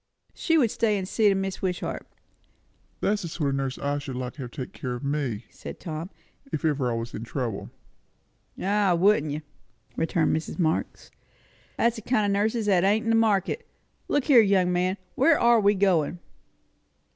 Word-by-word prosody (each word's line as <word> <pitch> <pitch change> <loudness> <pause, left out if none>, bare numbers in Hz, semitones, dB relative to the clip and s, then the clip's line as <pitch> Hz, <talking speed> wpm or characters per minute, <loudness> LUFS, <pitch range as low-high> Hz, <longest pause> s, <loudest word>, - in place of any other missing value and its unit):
She 325 -1 +1
would 240 -8 +3
stay 215 -3 +1
and 190 -1 -4
see 215 +1 +3
to 195 - +2
Mrs. 195 0 -3
Wishart." 180 -2 -3 0.9
"That's 210 0 +1
the 170 - -4
sort 155 -3 -2
of - - -1
nurse 135 -1 -2
I 145 0 -1
should 140 -3 -6
like 125 0 -4
to 145 - -9
have 125 - -5
take 125 +1 -7
care 125 -2 -4
of 120 - -8
me," 140 -6 -2
said - - -9
Tom, 165 0 -5 0.4
"if 155 - -2
ever 140 -5 +1
I 115 - -1
was 115 0 -5
in 110 - -5
trouble." 120 -4 -4 0.9
"Ah, 200 -2 +2
wouldn't 170 -4 +3
you!" 150 +1 -4 0.5
returned 165 0 +1
Mrs. 160 - -4
Marx. 160 -3 -1 0.7
"That's 235 0 +1
a - - -10
kind 215 -2 +1
o' 200 - +1
nurses 220 +1 0
that 190 -4 +3
ain't 210 +3 +3
in 225 - 0
the - - +4
market. 225 - +1 0.4
Look 290 - +1
here, 260 -6 +7
young 190 -4 +3
man 180 +2 0 0.2
where 310 +4 +4
are 235 -1 +5
we 205 0 +3
going?" 180 -4 +2
185 Hz, 190 wpm, -26 LUFS, 145-210 Hz, 0.9 s, here